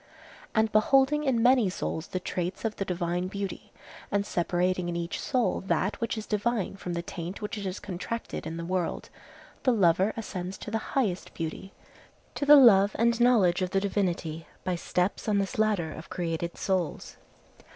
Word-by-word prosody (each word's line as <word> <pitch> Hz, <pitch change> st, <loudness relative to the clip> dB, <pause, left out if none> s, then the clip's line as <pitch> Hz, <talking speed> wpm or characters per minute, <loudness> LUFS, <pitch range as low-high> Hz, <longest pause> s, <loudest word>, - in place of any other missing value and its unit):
And 220 Hz, -1 st, +3 dB
beholding 270 Hz, +7 st, +4 dB
in 240 Hz, -4 st, +2 dB
many 245 Hz, -5 st, +5 dB
souls 160 Hz, -2 st, -4 dB
the 185 Hz, -, -3 dB
traits 180 Hz, +2 st, -4 dB
of 220 Hz, -1 st, -2 dB
the 195 Hz, -, -2 dB
divine 175 Hz, 0 st, -1 dB
beauty, 200 Hz, 0 st, -5 dB, 0.4 s
and 200 Hz, 0 st, +1 dB
separating 180 Hz, 0 st, 0 dB
in 170 Hz, -, -3 dB
each 170 Hz, 0 st, -3 dB
soul 255 Hz, -3 st, 0 dB
that 195 Hz, +3 st, 0 dB
which 230 Hz, 0 st, -1 dB
is 215 Hz, -, -4 dB
divine 210 Hz, -2 st, -1 dB
from 180 Hz, -2 st, -5 dB
the 170 Hz, 0 st, -3 dB
taint 175 Hz, +2 st, -6 dB
which 210 Hz, 0 st, -4 dB
it 205 Hz, -2 st, -5 dB
has 190 Hz, +1 st, -3 dB
contracted 200 Hz, 0 st, -5 dB
in 165 Hz, +1 st, -5 dB
the 170 Hz, -, -5 dB
world, 180 Hz, -1 st, -2 dB, 0.5 s
the 255 Hz, -, +3 dB
lover 190 Hz, -2 st, +3 dB
ascends 190 Hz, -4 st, -5 dB
to 215 Hz, -, -8 dB
the 225 Hz, -, 0 dB, 0.2 s
highest 200 Hz, -9 st, -1 dB
beauty, 165 Hz, +4 st, -5 dB, 0.6 s
to 285 Hz, -, -3 dB
the 295 Hz, -, +10 dB
love 205 Hz, -7 st, +7 dB
and 235 Hz, +1 st, +2 dB
knowledge 205 Hz, -8 st, +4 dB
of 185 Hz, -, 0 dB
the 195 Hz, -, +1 dB
Divinity, 175 Hz, -5 st, -2 dB, 0.2 s
by 185 Hz, -, -1 dB
steps 180 Hz, +5 st, -1 dB
on 205 Hz, -, +3 dB
this 195 Hz, +1 st, -2 dB
ladder 205 Hz, -7 st, +1 dB
of 160 Hz, +2 st, -9 dB
created 170 Hz, -1 st, -3 dB
souls. 185 Hz, -4 st, -2 dB
195 Hz, 180 wpm, -28 LUFS, 175-220 Hz, 0.6 s, the